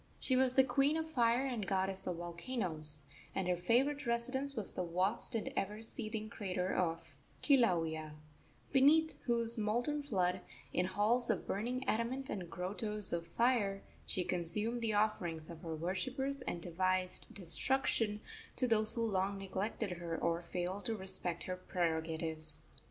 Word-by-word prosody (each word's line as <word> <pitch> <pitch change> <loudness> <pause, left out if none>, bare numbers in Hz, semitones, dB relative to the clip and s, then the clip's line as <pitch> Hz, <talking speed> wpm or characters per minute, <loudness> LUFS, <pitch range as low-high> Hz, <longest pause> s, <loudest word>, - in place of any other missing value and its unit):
She 260 - +1
was 255 -1 +4
the 265 - +7
queen 280 +3 +3
of 320 0 -2
fire 240 -1 +3
and 235 -7 -2
goddess 190 0 +1
of 180 - -1
volcanoes, 170 - -4 0.3
and 190 -2 0
her 180 - +3
favorite 255 +10 +2
residence 260 +4 0
was 215 -5 -1
the - - -2
vast 185 +7 0
and 225 - -2
ever 210 +2 -1
seething 215 -1 -4
crater 190 -5 -2
of 165 -2 -1 0.3
Kilauea, 165 - +3 0.6
beneath 300 +4 +5
whose 235 -1 0
molten 240 +8 +1
flood, 185 -9 0 0.3
in 180 - +2
halls 225 +6 +5
of 210 -6 +1
burning 250 +6 -2
adamant 245 +4 0
and 180 -4 -4
grottoes 205 +3 -2
of 170 -1 -2
fire, 205 -2 +2 0.2
she 185 - 0
consumed 210 +8 -1
the 225 -2 0
offerings 175 -7 0
of 165 -1 -10
her 165 -1 -4
worshippers 260 - -2
and 170 - -2
devised 185 +1 0
destruction 210 +3 +1 0.3
to 255 - +2
those 215 -2 +3
who 230 - -1
long 200 -1 0
neglected 195 +2 -2
her 165 -1 -3
or 170 0 0
failed 180 +3 -3
to 225 - 0
respect 185 -3 -3
her 185 - -3
prerogatives. 160 -3 -2
205 Hz, 150 wpm, -36 LUFS, 180-240 Hz, 0.6 s, the